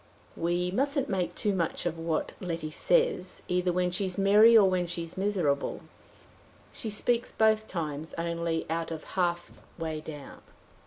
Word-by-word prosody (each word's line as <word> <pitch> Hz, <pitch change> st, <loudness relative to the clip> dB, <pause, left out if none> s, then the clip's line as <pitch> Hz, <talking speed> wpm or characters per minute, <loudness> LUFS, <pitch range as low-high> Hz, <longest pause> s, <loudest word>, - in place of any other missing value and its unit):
"We 175 Hz, +1 st, 0 dB
mustn't 280 Hz, +6 st, 0 dB
make 190 Hz, -3 st, -1 dB
too 205 Hz, -, 0 dB
much 175 Hz, -2 st, -1 dB
of 170 Hz, -1 st, -1 dB
what 165 Hz, -1 st, -1 dB
Letty 165 Hz, -4 st, -4 dB
says, 475 Hz, -, +1 dB
either 180 Hz, 0 st, +1 dB
when 180 Hz, 0 st, 0 dB
she's 185 Hz, 0 st, -1 dB
merry 210 Hz, +4 st, +7 dB
or 205 Hz, -3 st, +7 dB
when 180 Hz, -2 st, +1 dB
she's 170 Hz, -1 st, -4 dB
miserable. 185 Hz, -8 st, 0 dB, 0.9 s
She 225 Hz, -, -4 dB
speaks 230 Hz, +3 st, 0 dB
both 220 Hz, 0 st, +2 dB
times 155 Hz, -4 st, -4 dB
only 170 Hz, -1 st, -2 dB
out 165 Hz, +1 st, -2 dB
of 160 Hz, -2 st, -6 dB
half 175 Hz, -2 st, 0 dB, 0.3 s
way 160 Hz, -2 st, -3 dB
down." 145 Hz, -3 st, -9 dB
180 Hz, 150 wpm, -29 LUFS, 165-205 Hz, 0.9 s, merry